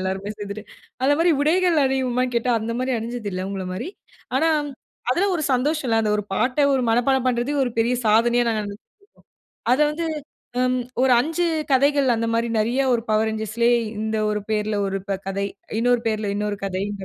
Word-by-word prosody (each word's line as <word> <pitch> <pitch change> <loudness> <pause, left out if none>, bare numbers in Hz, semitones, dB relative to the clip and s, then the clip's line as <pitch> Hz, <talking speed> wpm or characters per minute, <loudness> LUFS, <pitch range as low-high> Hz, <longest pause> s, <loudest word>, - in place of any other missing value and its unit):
எல்லாருமே 190 +2 -3
சேந்துட்டு. 205 0 -7 0.4
அந்த 275 +2 +4
மாரி 340 +1 +4
உடைகள் 345 +3 +3
அனிவோமானு 255 -1 0
கேட்டா 235 +1 +1
அந்த 225 +2 -3
மாரி 255 +1 -1
அனிஞ்சதில்ல 220 -5 -4
அவுங்கள 195 -1 -4
மாரி. 185 - -4 0.5
ஆனா, 325 - +3 0.6
அதில 385 +9 +1
ஒரு 315 - -3
சந்தோஷம்ல. 255 -3 +1
அந்த 215 - 0
ஒரு 210 - -3
பாட்ட 250 +6 0 0.2
ஒரு 260 - +1
மனப்பாடம் 255 +3 +2
பண்றதே 245 +3 0
ஒரு 245 - -2
பெரிய 235 +2 +2
சாதனயா 235 +3 +4
நாங்க 215 -1 -1 1.1
அத 260 - +3
வந்து 330 +2 -3 1.0
ஒரு 265 - +4
ம் 240 - +5
5 325 +6 -1 0.3
கதைகள் 280 +1 +3
அந்த 230 0 -1
மாரி 230 +1 0
நெறைய 235 +5 +1
1 235 -1 +1
பவர் 215 +1 +2
ரேஞ்சர்ஸ்லயே 220 +2 +1 0.2
இந்த 220 0 -1
1 210 0 -1
பெயருல 215 -1 0
1 195 0 -2
ப - - 0
கதை. 195 +1 -2 0.3
இன்னொரு 245 +1 +3
பேர்ல 215 -2 -1
இன்னொரு 210 0 -2
கதைன்ற 195 +1 -3
235 Hz, 170 wpm, -22 LUFS, 210-260 Hz, 1.1 s, ம்